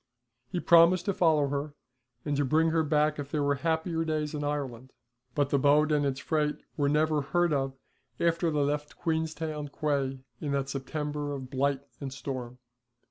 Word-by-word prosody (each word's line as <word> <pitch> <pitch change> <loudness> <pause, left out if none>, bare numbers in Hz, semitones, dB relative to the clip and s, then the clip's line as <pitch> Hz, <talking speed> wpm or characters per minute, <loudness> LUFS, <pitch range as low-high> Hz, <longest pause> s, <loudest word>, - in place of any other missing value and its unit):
He 180 - -2
promised 170 +1 +6
to 200 - +1
follow 155 -6 +3
her 145 +1 -3 0.5
and 145 -2 0
bring 160 +2 +3
her 165 0 +3
back 150 0 +1
if 140 -1 -5
there 145 0 0
were 145 0 +2
happier 160 +3 -1
days 155 -1 -2
in 150 -1 -3
Ireland, 130 -4 -4 0.4
but 145 -1 +1
the 140 - +3
boat 150 +2 +4
and 145 -1 +2
its 135 0 -2
freight 150 -1 0 0.2
were 145 -1 +1
never 155 0 +2
heard 175 +3 +1
of 135 -1 -1 0.4
after 170 0 +2
they 150 -2 +1
left 150 +1 -2
Queenstown 160 -2 -2
quay 140 -2 -1 0.2
in 145 -2 -2
that 140 -1 -1
September 145 +1 -3
of 130 -2 -7
blight 140 +1 0 0.2
and 140 -2 -5
storm. 125 -2 -5
150 Hz, 175 wpm, -29 LUFS, 140-160 Hz, 0.5 s, promised